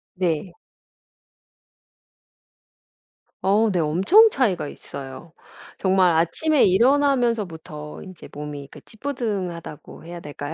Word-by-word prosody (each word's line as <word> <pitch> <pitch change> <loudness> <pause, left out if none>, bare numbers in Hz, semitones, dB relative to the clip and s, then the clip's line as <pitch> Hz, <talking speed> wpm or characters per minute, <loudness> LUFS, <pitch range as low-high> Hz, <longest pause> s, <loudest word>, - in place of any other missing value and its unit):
네. 175 -1 -1 2.9
어 210 +3 +3
네. 180 - 0
엄청 190 - +5
차이가 205 - 0
있어요. 135 +4 -9 0.5
정말 185 -2 +3
아침에 170 - +2
일어나면서부터 220 - +1
인제 185 -3 -12
몸이 145 -1 -7
그 - - -13
찌뿌둥하다고 210 - -5
해야 175 0 -8
될까요? 145 -1 -7
185 Hz, 220 characters per minute, -23 LUFS, 160-230 Hz, 2.9 s, 엄청